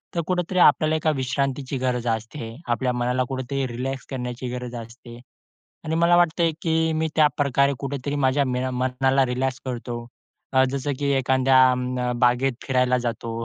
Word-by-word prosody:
तर 170 - +1
कुठेतरी 180 0 -1
आपल्याला 155 -1 +5
एका 155 0 +1
विश्रांतीची 135 0 -2
गरज 125 -2 -1
असते. 115 +1 -4
आपल्या 120 +2 +1
मनाला 125 +1 0
कुठेतरी 135 +1 -2
रिलॅक्स 130 +2 -4
करण्याची 125 -1 -5
गरज 125 0 -5
असते 120 +1 -10 0.7
आणि 160 - -2
मला 170 +1 +4
वाटतंय, 170 -1 +2
की 160 -1 +1
मी 160 0 0
त्याप्रकारे 140 -2 +3
कुठेतरी 140 0 -4
माझ्या 140 0 +2
मैना 130 0 -1
मनाला 130 +1 +1
रिलॅक्स 130 +1 -2
करतो. 120 -2 -5 0.5
अ, 130 0 +5
जसं 140 +1 -2
की 140 -1 0
एखाद्या 130 0 +3 0.2
अं, 125 -1 -2
बागेत 125 +2 +3
फिरायला 125 -1 +2
जातो 115 -1 -4
130 Hz, 150 wpm, -23 LUFS, 125-140 Hz, 0.7 s, आपल्याला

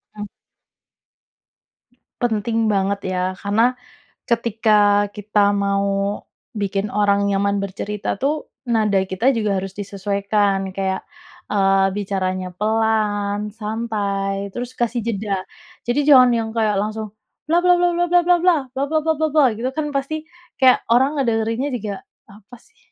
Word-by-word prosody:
Mmm. 210 0 -5 2.0
Penting 225 -1 0
banget 200 0 0
ya, 180 - -1 0.2
karena, 225 +5 +2 0.5
ketika 215 -3 +2
kita 205 -1 +1
mau 200 0 0 0.7
bikin 200 0 -1
orang 200 0 +1
nyaman 200 0 +1
bercerita 200 +1 -4
tuh, 290 +7 -2 0.2
nada 220 -4 +1
kita 190 +6 0
juga 210 -4 0
harus 195 0 -8
disesuaikan 200 -1 -1
kayak, 190 0 -2 0.5
eee, 195 -1 +3
bicaranya 185 -2 -2
pelan, 210 -1 0
santai, 205 -3 -3
terus 245 +5 -6
kasih 235 -1 -1
jeda. 200 -4 -2 0.4
Jadi 240 +4 0
jangan 255 -3 +8
yang 230 -1 0
kayak 215 -2 +1
langsung, 215 0 -4 0.3
bla 330 +3 +2
bla 360 0 +4
bla 355 0 +3
bla 345 +1 +1
bla 355 +1 +5
bla 355 +1 +5
bla, 355 -1 +4 0.2
bla 270 +1 -1
bla 315 +1 +1
bla 320 - +3
bla 315 - +2
bla 305 -2 +5
gitu 230 +4 -3
kan 295 -2 -2
pasti, 275 +2 -2 0.4
kayak 260 -1 +5
orang 265 +5 +3
ngederinnya 230 +1 0
juga, 210 -3 -5 0.4
"Apa 210 +4 -15
sih?" 450 - -27
210 Hz, 135 wpm, -20 LUFS, 200-240 Hz, 2.0 s, jangan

